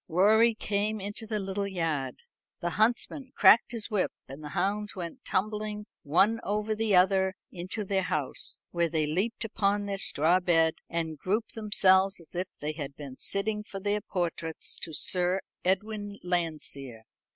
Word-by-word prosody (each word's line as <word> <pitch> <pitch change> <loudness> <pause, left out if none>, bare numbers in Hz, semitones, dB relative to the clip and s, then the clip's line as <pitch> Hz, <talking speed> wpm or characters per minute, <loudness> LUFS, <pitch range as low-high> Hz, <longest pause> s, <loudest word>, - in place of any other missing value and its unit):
Rorie 220 +7 +4
came 210 +1 -1
into 205 +3 -6
the 215 -1 -1
little 200 0 -2
yard. 165 - -2 0.4
The 175 -1 -2
huntsman 240 - +1
cracked 215 +4 +6
his 230 -2 -4
whip, 205 -3 +1 0.2
and 135 +3 -10
the 150 - -6
hounds 205 +1 0
went 180 +7 -6
tumbling 210 +1 -2 0.2
one 195 +10 +3
over 210 +2 -1
the 215 -2 +1
other 190 +1 +4 0.2
into 185 +4 -5
their 195 -1 0
house, 150 -7 -1
where 170 -1 +1
they 160 -2 +1
leaped 200 +10 -1
upon 205 -2 0
their 200 -1 -3
straw 170 +1 +3
bed, 165 -3 +3 0.2
and 160 -3 -3
grouped 215 +7 -1
themselves 195 -3 +3
as 170 - -12
if 180 +1 -2
they 150 +1 -3
had 145 -3 -6
been 140 -3 -9
sitting 210 +1 0
for 195 -2 -7
their 205 +1 0
portraits 170 -4 -3
to 165 - -5
Sir 180 +4 +2 0.2
Edwin 205 +2 -1
Landseer. 155 -9 -3
190 Hz, 160 wpm, -29 LUFS, 170-210 Hz, 0.4 s, cracked